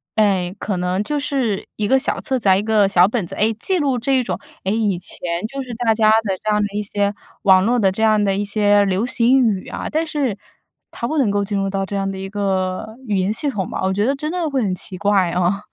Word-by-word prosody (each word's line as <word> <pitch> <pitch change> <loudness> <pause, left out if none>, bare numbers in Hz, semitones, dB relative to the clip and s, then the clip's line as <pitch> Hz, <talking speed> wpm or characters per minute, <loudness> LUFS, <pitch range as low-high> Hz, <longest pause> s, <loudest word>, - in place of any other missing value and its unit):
哎， 195 -3 +1
可 200 -2 -3
能 180 +2 -1
就 295 +6 -2
是 265 -8 -1
一 210 -1 -1
个 265 +3 +4
小 - - -1
册 265 -4 -1
子 200 -4 +1
啊、 190 - +6
一 195 - 0
个 215 -2 +3
小 180 -2 +5
本 215 -4 -2
子。 - - -8
诶， 220 +2 +2
记 365 - -1
录 275 -6 0
这 270 +4 0
一 255 - +1
种， 185 -6 -3 0.2
诶， 190 - 0
以 210 -5 0
前 175 - -6 0.3
就 275 +4 -5
是 255 -2 -7
大 230 -1 +2
家 215 -1 +3
的 195 -3 -1
这 215 - -1
样 210 - +2
的 205 - +1
一 210 - 0
些 205 0 -1 0.3
网 190 -2 +6
络 245 +2 +2
的 195 -5 +3
这 195 - -5
样 215 -1 +4
的 195 -1 +1
一 205 - -1
些 205 0 +3
流 195 +4 0
行 250 +2 +3
语 200 -4 -1
啊， - - -5
但 320 +1 0
是 270 -10 -1 0.5
它 235 - -4
不 310 +4 -2
能 250 -6 +2
够 200 0 0
进 205 0 -3
入 195 0 -1
到 195 0 -2
这 200 - -5
样 195 0 -1
的 195 - -5
一 195 0 -6
个 195 +1 -2
语 205 -2 0
言 190 +2 +1
系 285 +6 0
统 195 -8 -3
吧， - - -4
我 190 0 +1
觉 205 +2 +1
得 275 - +1
真 305 +3 -4
的 345 -4 -1
会 270 -3 0
很 195 -3 0
奇 185 0 -5
怪， 200 -2 +2
啊。 180 +3 0
205 Hz, 290 characters per minute, -20 LUFS, 195-240 Hz, 0.5 s, 啊